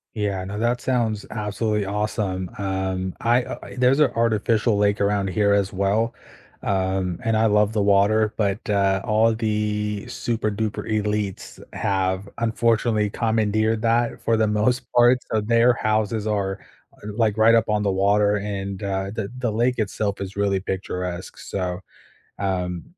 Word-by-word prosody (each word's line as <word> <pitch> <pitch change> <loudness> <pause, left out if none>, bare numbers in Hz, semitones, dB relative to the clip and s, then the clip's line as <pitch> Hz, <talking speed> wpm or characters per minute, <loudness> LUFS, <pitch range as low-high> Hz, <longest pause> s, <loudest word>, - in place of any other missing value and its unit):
Yeah, 100 -3 -1
no, 100 +2 -5
that 120 +2 0
sounds 115 -5 -1
absolutely 105 0 -1
awesome, 100 -2 -2
um, 95 -2 -2
I 120 +2 +3
uh, - - -6 0.2
there's 125 +3 +3
a 145 -4 +5
artificial 115 -1 +1
lake 100 0 +2
around 100 -1 +1
here 100 +2 +2
as 100 -1 +1
well, 105 +4 0 0.5
um, 95 -2 -1
and 115 -1 +1
I 110 +1 +3
love 105 0 +3
the 105 - +1
water, 105 +2 +3
but, 100 -1 -1
uh, 100 -2 +2
all 110 +1 +3
the 105 -1 -2
super 120 -3 -2
duper 110 +1 -3
elites 105 -2 -2
have 95 0 -1
unfortunately 115 -2 +1
commandeered 110 0 +1
that 115 +1 +1
for 115 - +1
the 110 0 +2
most 105 +4 0
part, 120 +1 +5
so 110 - +1
their 115 +3 +3
houses 110 -1 0
are 100 -2 -1 0.4
are, 105 - -7
like, 110 -1 +1
right 115 +1 +6
up 115 0 +3
on 105 -1 +1
the 100 - +1
water, 100 +2 +3
and, 100 -1 -4
uh, 95 -1 -2
the 110 -2 -4
the 120 -4 -1
lake 120 +3 +1
itself 105 -1 -2
is 95 0 -7
really 100 -1 +1
picturesque, 90 -1 -4
so 90 -1 -4 0.6
um 90 -3 -2
105 Hz, 155 wpm, -23 LUFS, 100-110 Hz, 0.6 s, right